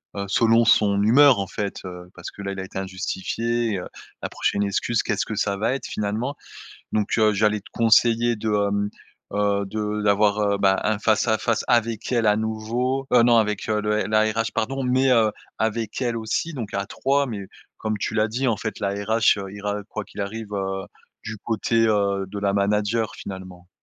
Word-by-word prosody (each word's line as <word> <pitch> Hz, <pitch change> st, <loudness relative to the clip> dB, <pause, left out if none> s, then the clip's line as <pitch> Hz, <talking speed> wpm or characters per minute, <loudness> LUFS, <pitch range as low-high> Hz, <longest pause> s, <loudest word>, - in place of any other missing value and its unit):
heu, 100 Hz, 0 st, -3 dB
selon 115 Hz, +2 st, +4 dB
son 100 Hz, -3 st, +4 dB
humeur 130 Hz, +3 st, +6 dB
en 95 Hz, -, -2 dB
fait, 100 Hz, 0 st, -4 dB
heu, 90 Hz, -1 st, -8 dB
parce 85 Hz, -, -8 dB
que 100 Hz, -, -10 dB
là, 100 Hz, -, -3 dB
il 95 Hz, -, -6 dB
a -, -, -3 dB
été 95 Hz, -, -8 dB
injustifié, 105 Hz, +4 st, -2 dB
heu, 90 Hz, -, -6 dB, 0.3 s
la -, -, -3 dB
prochaine 100 Hz, -, -1 dB
excuse, 100 Hz, +3 st, 0 dB
qu'est-ce 105 Hz, -, -1 dB
que 110 Hz, -, -5 dB
ça 100 Hz, -1 st, 0 dB
va 115 Hz, +5 st, 0 dB
être 135 Hz, -, -4 dB
finalement? 110 Hz, +7 st, -2 dB, 0.6 s
Donc, 105 Hz, -1 st, 0 dB
heu, 110 Hz, -1 st, +4 dB
j'allais 105 Hz, +1 st, +2 dB
te -, -, -17 dB
conseiller 115 Hz, +1 st, +3 dB
de, 110 Hz, +1 st, -2 dB, 0.2 s
hem, 100 Hz, 0 st, -1 dB, 0.4 s
heu, 100 Hz, -1 st, +1 dB
de 105 Hz, +1 st, -3 dB
d'avoir, 105 Hz, 0 st, +3 dB
heu, 100 Hz, -1 st, +1 dB
bah 95 Hz, -1 st, +3 dB
un 110 Hz, -1 st, +1 dB
face 110 Hz, +1 st, +2 dB
à 110 Hz, -1 st, +3 dB
face 115 Hz, 0 st, 0 dB
avec 115 Hz, 0 st, +1 dB
elle 115 Hz, -2 st, +2 dB
à 105 Hz, 0 st, +4 dB
nouveau, 115 Hz, +5 st, -2 dB
heu, 120 Hz, -1 st, +6 dB
non 120 Hz, -1 st, +5 dB
avec, 105 Hz, -1 st, 0 dB
heu, 105 Hz, -, +1 dB
le 105 Hz, 0 st, 0 dB
la 110 Hz, +1 st, +3 dB
RH, 115 Hz, +1 st, -1 dB
pardon, 135 Hz, +4 st, -1 dB
mais 130 Hz, +1 st, +2 dB
heu, 110 Hz, -3 st, +4 dB, 0.3 s
avec 110 Hz, +2 st, -2 dB
elle 120 Hz, -2 st, -1 dB
aussi, 110 Hz, +9 st, -2 dB
donc 115 Hz, -9 st, -6 dB
à 100 Hz, 0 st, -1 dB
3. 140 Hz, +6 st, 0 dB
Mais 100 Hz, -6 st, -5 dB, 0.3 s
comme 110 Hz, -1 st, -2 dB
tu 100 Hz, -, -3 dB
l'as 110 Hz, 0 st, +2 dB
dit, 125 Hz, +5 st, -2 dB
en 110 Hz, -, 0 dB
fait, 110 Hz, -, -5 dB
la 100 Hz, -, 0 dB
RH, 105 Hz, +2 st, +2 dB
heu, 95 Hz, -1 st, -6 dB
ira, 105 Hz, +1 st, -3 dB
heu, 105 Hz, -, -9 dB
quoi 105 Hz, -2 st, -5 dB
qu'il 105 Hz, -, -9 dB
arrive, 105 Hz, +1 st, -5 dB
heu, 95 Hz, -1 st, -2 dB, 0.4 s
du 110 Hz, 0 st, -5 dB
côté, 115 Hz, +1 st, +1 dB
heu, 100 Hz, -2 st, +1 dB
de 100 Hz, -, -6 dB
la 100 Hz, -1 st, 0 dB
manager, 105 Hz, +2 st, 0 dB
finalement. 95 Hz, -2 st, -9 dB
105 Hz, 210 wpm, -23 LUFS, 100-115 Hz, 0.6 s, humeur